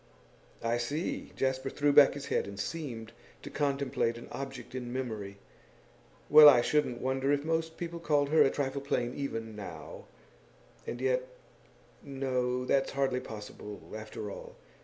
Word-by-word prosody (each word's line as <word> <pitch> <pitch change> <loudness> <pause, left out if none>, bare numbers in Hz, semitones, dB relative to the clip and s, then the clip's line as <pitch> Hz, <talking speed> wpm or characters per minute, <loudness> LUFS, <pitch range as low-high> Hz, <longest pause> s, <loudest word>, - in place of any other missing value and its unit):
'I 115 +1 +1
see.' 145 +8 -3
Jasper 130 0 -1
threw 145 +1 +1
back 140 -1 +7
his 140 -1 -6
head - - 0
and 100 0 -8
seemed 115 -4 -5 0.3
to 145 - -8
contemplate 140 -5 0
an 120 - -10
object 135 -3 -7
in 125 -2 -5
memory. 110 -6 -4 0.9
'Well, 150 -1 +11
I 125 -4 +6
shouldn't 150 -5 +1
wonder 130 +1 0
if 145 0 +1
most 160 0 -1
people 170 -1 -5
called 145 -4 +1
her 160 +1 +5
a - - +6
trifle 140 -1 -2
plain 125 -3 -1
even 115 -6 -4
now; 105 -2 -8 0.8
and 120 - -4
yet 130 0 +1 0.7
no, 125 -2 -1
that's 135 +1 +1
hardly 135 -2 +1
possible, 105 -3 -8 0.2
after 110 -1 -6
all. - - -9
130 Hz, 150 wpm, -31 LUFS, 120-145 Hz, 0.9 s, Well